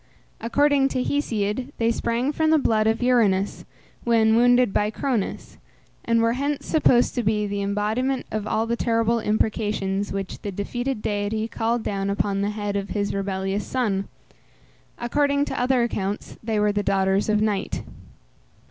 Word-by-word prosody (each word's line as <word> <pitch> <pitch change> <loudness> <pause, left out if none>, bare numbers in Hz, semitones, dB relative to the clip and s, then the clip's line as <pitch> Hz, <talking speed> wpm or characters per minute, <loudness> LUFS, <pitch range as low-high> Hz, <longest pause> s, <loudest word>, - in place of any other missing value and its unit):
According 280 +3 +3
to 255 -2 -1
Hesiod, 245 -2 -1
they 230 0 +2
sprang 235 +4 -1
from 315 +1 +1
the 315 - +5
blood 220 -6 +2
of 225 +2 +1
Uranus, 210 -6 +2 0.4
when 225 -2 +3
wounded 245 -2 +4
by 210 - +1
Cronus, 230 -1 -3 0.4
and 230 0 +2
were 230 0 +2
hence 280 +3 -2
supposed 250 -6 +3
to 245 - 0
be 210 -1 +1
the 200 0 -3
embodiment 215 +6 -1
of 215 -1 -3
all 220 +1 0
the 235 +1 -1
terrible 230 0 +1
imprecations, 210 -2 -1
which 195 -1 -5
the 205 - -4
defeated 240 +5 -3
deity 210 +1 -1
called 230 0 -1
down 195 -1 -2
upon 200 0 0
the 200 - 0
head 205 -1 -3
of 200 -1 -2
his 205 0 -1
rebellious 195 0 -2
son. 210 -7 -1 0.9
According 280 +4 +1
to - - -4
other 250 -1 +2
accounts 205 -3 -3
they 220 -1 0
were 210 0 +3
the 205 0 0
daughters 195 +1 +1
of 210 0 +3
Night. 210 -2 -1
220 Hz, 160 wpm, -24 LUFS, 205-245 Hz, 0.9 s, the